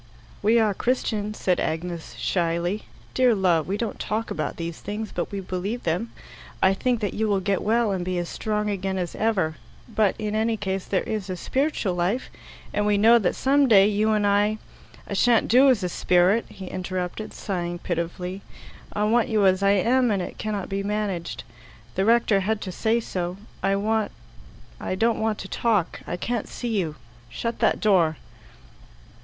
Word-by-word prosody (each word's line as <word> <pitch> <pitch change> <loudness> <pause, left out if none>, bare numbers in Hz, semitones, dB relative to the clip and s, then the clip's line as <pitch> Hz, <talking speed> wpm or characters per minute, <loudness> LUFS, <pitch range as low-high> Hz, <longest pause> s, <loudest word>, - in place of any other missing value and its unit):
"We 220 +3 +4
are 220 -3 +3
Christians," 215 -2 -1
said 180 -2 +1
Agnes 165 +1 -3
shyly. 175 +3 -1 0.3
"Dear 250 -3 +4
love, 175 -5 +2
we 195 +2 -1
don't 230 0 -3
talk 220 +2 -2
about - - -2
these 170 -1 -5
things, 210 +1 -5
but - - -3
we 200 -1 -3
believe 190 +6 -4
them. 175 +8 -1 0.5
I 190 0 +4
think 240 +3 0
that 205 - -1
you 220 0 0
will 200 -2 +2
get 195 0 0
well 225 0 +2
and 185 -2 -1
be 180 0 -2
as 175 -1 -2
strong 210 +2 -2
again 195 -1 -2
as 180 -2 -3
ever; 190 -8 0 0.3
but, 215 -4 +1
in 210 -1 -3
any 220 +1 +1
case, 195 -2 -3
there 190 - 0
is 210 -3 -4
a 185 - -3
spiritual 265 - 0
life, 180 +8 -1 0.4
and 210 0 +1
we 205 -1 +3
know 230 +3 +6
that 195 - 0
some 280 +1 +3
day 200 -5 +7
you 215 +1 +2
and 210 -1 +2
I 205 +1 +3 0.2
" - - -22
"I - - -4
shan't 230 +3 +3
do 260 +3 +6
as 235 -7 +3
a - - +1
spirit," 180 +6 +3
he 190 - -9
interrupted, 185 +2 -4
sighing 175 -3 -3
pitifully. 180 +2 -4 0.5
"I 210 - -1
want 225 +2 +2
you 215 -3 +3
as 190 0 +4
I 200 0 +4
am, 240 +6 +3
and 205 -3 +1
it 180 - -6
cannot 210 -3 -3
be 195 0 -2
managed. 200 -4 -3 0.5
The 190 - 0
rector 230 -3 +4
had 210 +3 0
to 185 - -4
say 225 +6 +1
so. 180 -3 -4 0.2
I 195 - +2
want 215 +1 0 0.7
I - - -3
don't 225 +3 +1
want 220 -1 0
to - - -7
talk. 210 -5 0
I - - -3
can't 235 +3 -2
see 230 -4 -2
you. 160 -5 -2 0.3
Shut 230 - -4
that - - +2
door." 175 -7 +3
205 Hz, 190 wpm, -25 LUFS, 185-220 Hz, 0.7 s, day